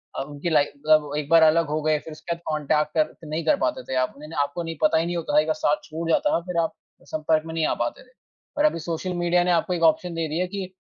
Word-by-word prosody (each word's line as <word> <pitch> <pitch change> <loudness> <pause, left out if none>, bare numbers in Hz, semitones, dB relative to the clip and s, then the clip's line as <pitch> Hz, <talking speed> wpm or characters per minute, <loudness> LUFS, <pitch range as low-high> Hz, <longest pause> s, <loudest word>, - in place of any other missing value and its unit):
अ, - - -2
उनकी 145 +4 -5
लाइफ़ 145 -2 +3
मतलब 150 0 +2
एक 150 -1 -4
बार 165 0 +7
अलग 160 0 +4
हो 155 +1 -1
गए 155 0 +2
फ़िर 160 - -11
उसके 170 +2 -5
बाद 170 - -18
कांटेक्ट 150 0 0
कर 155 +1 -1
नहीं 155 +1 -3
कर - - +4
पाते 125 - -2
थे - - -1
आप। - - -3
उन्होंने 150 +3 -10
आपको 145 +4 -4
नहीं 165 0 -5
पता 205 -5 +4
ही 165 - +1
नहीं 175 0 -2
होता 165 -3 -3
था 150 - +6
एक 155 - -5
बार 155 - +2
साथ 150 -1 +1
छूट 165 +1 -5
जाता 295 - +3
है - - +2
ना 170 - 0
फ़िर 180 -2 -4
आप 160 - -3 0.4
संपर्क 155 0 +1
में 160 - -6
नहीं 160 -1 0
आ - - +1
पाते 120 - -5
थे। 255 - -25 0.5
और 295 - +3
अभी 300 - +2
सोशल 170 +3 -3
मीडिया 175 0 +2
ने 180 - +1
आपको 175 +1 +1
एक 170 -1 -2
ऑप्शन 170 +2 +3
दे 165 -1 -2
दिया 160 +4 -1
है 185 - -3
कि 190 -1 -6
160 Hz, 300 wpm, -24 LUFS, 155-170 Hz, 0.5 s, बार